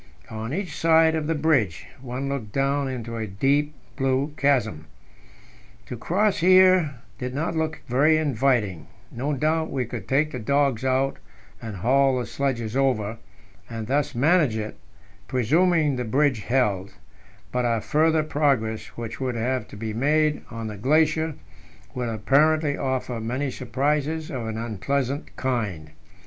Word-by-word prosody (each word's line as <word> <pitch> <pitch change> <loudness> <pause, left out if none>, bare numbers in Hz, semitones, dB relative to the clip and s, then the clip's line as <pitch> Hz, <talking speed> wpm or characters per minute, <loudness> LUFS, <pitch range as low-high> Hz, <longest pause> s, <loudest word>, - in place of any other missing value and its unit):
On 110 +2 -5
each 175 -1 -3
side 160 0 +4
of 155 -2 -2
the 165 - 0
bridge, 145 - +1 0.2
one 130 +1 -4
looked 135 -7 -4
down 140 +2 0
into 120 -3 -5
a 110 -1 -3
deep 140 +9 +1 0.2
blue 135 +2 0
chasm. 125 - +1 1.0
To 125 - -6
cross 195 - +1
here 185 -4 +5 0.2
did 125 0 -4
not 160 +3 -2
look 160 0 -2
very 145 +6 +4
inviting; 125 - 0 0.2
no 135 +5 -2
doubt 160 +3 0
we 130 -2 -2
could 110 -5 -7
take 150 +3 +2
the 125 - -5
dogs 140 0 +1
out 130 +1 +1 0.4
and 110 -3 -6
haul 130 +7 +3
the 125 - -2
sledges 120 -5 -2
over, 115 -5 0 0.5
and 115 -2 -5
thus 140 +3 0
manage 145 -2 +3
it 110 0 -5 0.5
presuming 150 +4 +2
the 125 - -1
bridge 130 +1 +1
held 105 -7 0 0.6
but 125 0 0
our 115 -2 +1
further 155 +6 +2
progress, 135 -8 0
which 115 +2 -6
would 130 -2 -1
have 125 +3 -1
to - - -11
be 110 0 -4
made 150 +5 +2
on 115 -1 -6
the 105 -2 -6
glacier, 155 +6 +2 0.6
would 125 -2 -3
apparently 145 +7 +2
offer 130 -3 -2
many 130 +5 -2
surprises 145 +6 -1
of 125 -5 -4
an 110 0 -4
unpleasant 130 - -2
kind. 105 - -2
135 Hz, 150 wpm, -24 LUFS, 115-150 Hz, 1.0 s, here